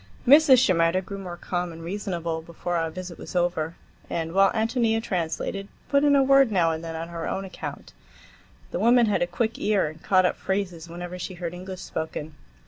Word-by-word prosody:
Mrs. 285 Hz, -1 st, +8 dB
Shimerda 185 Hz, -5 st, +3 dB
grew 200 Hz, +1 st, -6 dB
more 180 Hz, -3 st, -7 dB
calm 175 Hz, -1 st, -3 dB
and 165 Hz, 0 st, -10 dB
reasonable 170 Hz, -3 st, -3 dB
before 170 Hz, +2 st, -4 dB
our 165 Hz, -1 st, 0 dB
visit 180 Hz, +1 st, -8 dB
was -, -, -9 dB
over, 170 Hz, -2 st, 0 dB, 0.3 s
and, 165 Hz, 0 st, -3 dB
while 195 Hz, +1 st, +5 dB
Ántonia 225 Hz, 0 st, +1 dB
translated, 185 Hz, 0 st, -3 dB, 0.2 s
put 280 Hz, 0 st, +3 dB
in 290 Hz, -1 st, +5 dB
a 275 Hz, -, +5 dB
word 275 Hz, -2 st, +5 dB
now 170 Hz, -5 st, +3 dB
and 160 Hz, +1 st, -4 dB
then 165 Hz, -1 st, -5 dB
on 165 Hz, +1 st, -5 dB
her 170 Hz, -1 st, -4 dB
own 195 Hz, -, -3 dB
account. 185 Hz, -, -8 dB, 0.8 s
The -, -, -2 dB
woman 240 Hz, +1 st, +5 dB
had 210 Hz, -, +1 dB
a 175 Hz, -, +2 dB
quick 225 Hz, +5 st, -2 dB
ear, 205 Hz, -2 st, +2 dB
and 155 Hz, +1 st, -7 dB
caught 185 Hz, -1 st, +3 dB
up -, -, +1 dB
phrases 180 Hz, -4 st, -3 dB
whenever 175 Hz, +1 st, -7 dB
she 185 Hz, +1 st, -5 dB
heard 175 Hz, -1 st, -5 dB
English 185 Hz, +1 st, -7 dB
spoken. 160 Hz, -3 st, -5 dB
180 Hz, 200 wpm, -25 LUFS, 165-210 Hz, 0.8 s, Mrs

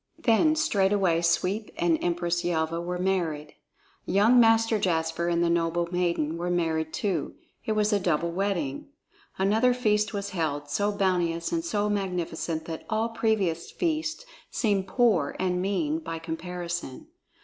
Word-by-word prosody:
Then 285 Hz, +7 st, +3 dB
straightway 195 Hz, -, +2 dB
Sweep 185 Hz, +5 st, 0 dB
and 170 Hz, -2 st, +1 dB
Empress 175 Hz, 0 st, 0 dB
Yelva 165 Hz, -1 st, -1 dB
were 180 Hz, +1 st, -3 dB
married. 170 Hz, -5 st, -1 dB, 0.5 s
Young 220 Hz, +6 st, +5 dB
Master 225 Hz, -1 st, +4 dB
Jasper 165 Hz, -2 st, 0 dB
and 170 Hz, 0 st, +1 dB
the -, -, +2 dB
noble 170 Hz, 0 st, +1 dB
maiden 170 Hz, -3 st, 0 dB
were 175 Hz, +1 st, -2 dB
married 160 Hz, -2 st, 0 dB
too; 180 Hz, -6 st, -2 dB, 0.3 s
it 220 Hz, -, +1 dB
was 215 Hz, 0 st, +1 dB
a 205 Hz, -, +3 dB
double 170 Hz, -2 st, 0 dB
wedding. 175 Hz, -7 st, -2 dB, 0.5 s
Another 220 Hz, +6 st, +3 dB
feast 210 Hz, -3 st, +1 dB
was 200 Hz, -1 st, -4 dB
held, 145 Hz, -5 st, -2 dB
so 205 Hz, +7 st, +1 dB
bounteous 175 Hz, -4 st, 0 dB
and 330 Hz, -1 st, -1 dB
so 210 Hz, -10 st, 0 dB
magnificent 175 Hz, -5 st, -2 dB
that 160 Hz, -1 st, -6 dB
all 220 Hz, +1 st, 0 dB
previous 210 Hz, -7 st, 0 dB
feasts 320 Hz, +5 st, -2 dB, 0.2 s
seemed 200 Hz, -4 st, 0 dB
poor 195 Hz, -, +2 dB
and 180 Hz, -1 st, 0 dB
mean 170 Hz, -5 st, 0 dB
by 165 Hz, 0 st, -5 dB
comparison. 170 Hz, -2 st, -5 dB
180 Hz, 145 wpm, -27 LUFS, 165-210 Hz, 0.5 s, Young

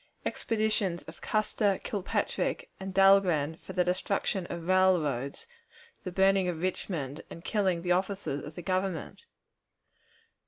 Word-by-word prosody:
Expeditions 215 Hz, -5 st, 0 dB
of -, -, -12 dB
Custer, 210 Hz, -2 st, +1 dB
Kilpatrick, 225 Hz, -, -2 dB
and 190 Hz, 0 st, -5 dB
Dahlgren 185 Hz, -6 st, +4 dB
for 190 Hz, -, -10 dB
the 180 Hz, -1 st, +3 dB
Destruction 185 Hz, +1 st, -1 dB
of 170 Hz, -1 st, -6 dB
Railroads, 175 Hz, -, +2 dB, 0.6 s
the 185 Hz, -, -5 dB
Burning 190 Hz, 0 st, +3 dB
of 170 Hz, -3 st, -2 dB
Richmond, 165 Hz, -5 st, -3 dB
and 165 Hz, -, -10 dB
Killing 190 Hz, -6 st, +1 dB
the 180 Hz, -, 0 dB
Officers 190 Hz, -5 st, 0 dB
of 150 Hz, +1 st, -9 dB
the 175 Hz, -, -7 dB
Government. 185 Hz, -, -2 dB
185 Hz, 125 wpm, -29 LUFS, 170-195 Hz, 0.6 s, Dahlgren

